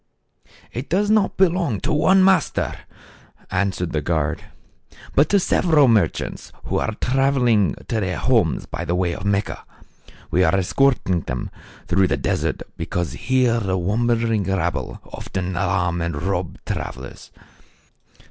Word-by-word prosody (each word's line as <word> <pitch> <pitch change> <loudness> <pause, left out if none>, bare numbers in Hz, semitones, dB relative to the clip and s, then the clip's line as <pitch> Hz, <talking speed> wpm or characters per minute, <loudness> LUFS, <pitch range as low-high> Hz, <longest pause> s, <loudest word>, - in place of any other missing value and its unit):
" - - -27
ft 125 +4 -5
does 205 +4 +2
not 215 -2 +2
belong 175 - +2
to - - -1
one 185 +6 +4
master," 190 -4 +2 0.8
answered 90 -2 -1
the 75 - -1
guard, 80 -2 -1 0.7
"but 145 +2 +4
to 200 - +4
several 160 -5 +3
merchants 105 -9 0
who - - -1
are 110 - -2
traveling 125 - +2
to 115 - -1
their 95 -3 -2
homes 115 -11 +1
by - - -5
way 90 0 0
of 95 - -7
Mecca. 100 +1 -1 0.7
We 90 - +3
are 80 +1 +3
escorting 95 -2 +2
them 65 0 -4 0.4
through 95 +1 +3
the - - 0
desert - - -1
because 90 -1 -2
THE - - -9
CARAVAN. 130 - -2
83 - - +5
here 115 - +1
the 95 -3 -1
wandering 115 +3 +1
rabble 90 -3 -2
often 95 -1 -5
alarm 90 -2 0
and 85 -3 -2
rob 90 -1 -2
travelers. 65 +2 -6
100 Hz, 150 wpm, -21 LUFS, 90-135 Hz, 0.8 s, 83